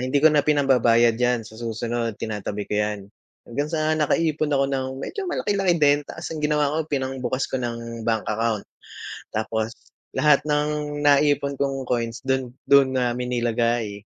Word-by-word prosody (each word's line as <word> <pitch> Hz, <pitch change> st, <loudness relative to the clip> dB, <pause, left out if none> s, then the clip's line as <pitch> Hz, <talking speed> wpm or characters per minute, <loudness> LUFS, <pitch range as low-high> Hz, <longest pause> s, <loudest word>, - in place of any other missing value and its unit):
hindi 130 Hz, +3 st, -1 dB
ko 155 Hz, +2 st, +6 dB
na 150 Hz, -, +5 dB
pinambabayad 125 Hz, -6 st, +4 dB
yan 120 Hz, -2 st, +1 dB
sa 110 Hz, 0 st, -12 dB
susunod, 115 Hz, -1 st, -2 dB
tinatabi 105 Hz, -1 st, -4 dB
ko 105 Hz, -, -1 dB
yan, 105 Hz, -1 st, -2 dB, 0.4 s
hanggang 145 Hz, +5 st, -3 dB
sa 155 Hz, -1 st, 0 dB
nakaipon 155 Hz, 0 st, +1 dB
ako 140 Hz, -2 st, +2 dB
ng 135 Hz, -1 st, -1 dB
medyo 375 Hz, -, -5 dB
malaki-laki 195 Hz, -, +1 dB
din, 145 Hz, -2 st, +4 dB
tas 165 Hz, -, -8 dB
ang 155 Hz, -, -5 dB
ginawa 150 Hz, -1 st, +1 dB
ko 155 Hz, 0 st, -2 dB
pinangbukas 130 Hz, -2 st, -2 dB
ko 130 Hz, -, 0 dB
ng 115 Hz, -1 st, -5 dB
bank 110 Hz, -1 st, 0 dB
account. 110 Hz, -1 st, -1 dB, 0.7 s
Tapos 110 Hz, +1 st, -2 dB, 0.4 s
lahat 150 Hz, -1 st, +4 dB
ng 150 Hz, 0 st, -1 dB
naipon 145 Hz, -1 st, +3 dB
kong 135 Hz, -2 st, -2 dB
coins 120 Hz, +1 st, -1 dB
dun, 130 Hz, -2 st, 0 dB, 0.2 s
dun 140 Hz, -2 st, +6 dB
namin 125 Hz, -1 st, -1 dB
nilagay. 115 Hz, -3 st, -1 dB
130 Hz, 155 wpm, -23 LUFS, 115-150 Hz, 0.7 s, ko